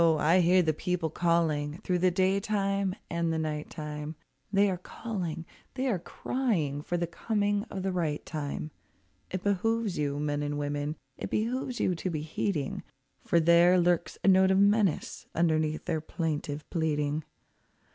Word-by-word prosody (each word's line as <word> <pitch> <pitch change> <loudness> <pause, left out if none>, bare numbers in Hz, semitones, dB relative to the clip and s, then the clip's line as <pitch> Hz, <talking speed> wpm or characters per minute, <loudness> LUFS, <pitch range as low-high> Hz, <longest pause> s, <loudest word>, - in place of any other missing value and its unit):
I 165 +1 +4
hear 180 +1 +5
the 155 -1 +2
people 170 0 -2
calling 160 -3 +1
through 180 -1 +1
the 185 +1 +4
day 190 +2 +2
time 195 -2 0
and 170 -1 -1
the 160 - 0
night 155 -1 -3
time, 150 0 -6 0.4
They 200 0 +4
are 180 - -3
calling, 180 -6 -5 0.3
they 260 0 -1
are 200 -7 +1
crying 170 - -1
for 175 +4 -2
the 170 - 0
coming 205 +3 0
of 195 -5 -6
the 190 - 0
right 160 -5 -1
time. 150 0 -4 0.6
It 185 -1 -4
behooves 210 0 0
you, 145 -1 -1
men 145 0 -1
and 145 0 -2
women, 145 +1 -2 0.2
it - - -4
behooves 245 +3 -1
you 185 - +2
to 175 +2 -3
be 155 -3 -2
heeding, 155 -2 -2 0.4
For 170 - +3
there 170 +2 +6
lurks 175 -1 +1
a - - +1
note 190 0 +6
of 190 - +4
menace 200 -2 +2
underneath 155 -2 +1
their 160 -3 -1
plaintive 155 -2 -3
pleading. 150 -2 0
170 Hz, 165 wpm, -29 LUFS, 155-190 Hz, 0.6 s, there